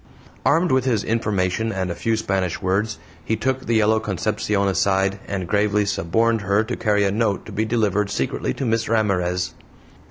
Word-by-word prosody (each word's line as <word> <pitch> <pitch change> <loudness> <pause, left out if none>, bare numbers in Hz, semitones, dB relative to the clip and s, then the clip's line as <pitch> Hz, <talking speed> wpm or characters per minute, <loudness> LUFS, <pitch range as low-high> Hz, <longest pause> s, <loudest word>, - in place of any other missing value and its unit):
Armed 165 +4 +3
with 130 -1 +2
his 115 -5 +1
information 110 -1 0
and 95 -3 -2
a - - -1
few 115 -1 0
Spanish 95 -5 -1
words, 100 +3 0 0.3
he 110 - 0
took 130 +4 -2
the 115 - +2
yellow 110 0 +3
Concepcion 105 0 -1
aside 95 0 +1
and 95 -3 -3
gravely 105 +1 +2
suborned 110 +5 +1
her 100 +2 +2
to 110 - -4
carry 105 -2 +1
a 100 - +2
note 105 -2 0
to - - -9
be 110 - -1
delivered 105 -3 +1
secretly 65 - -2
to 135 - -3
Miss 115 -1 0
Ramirez. 90 -5 0
105 Hz, 180 wpm, -22 LUFS, 95-110 Hz, 0.3 s, Armed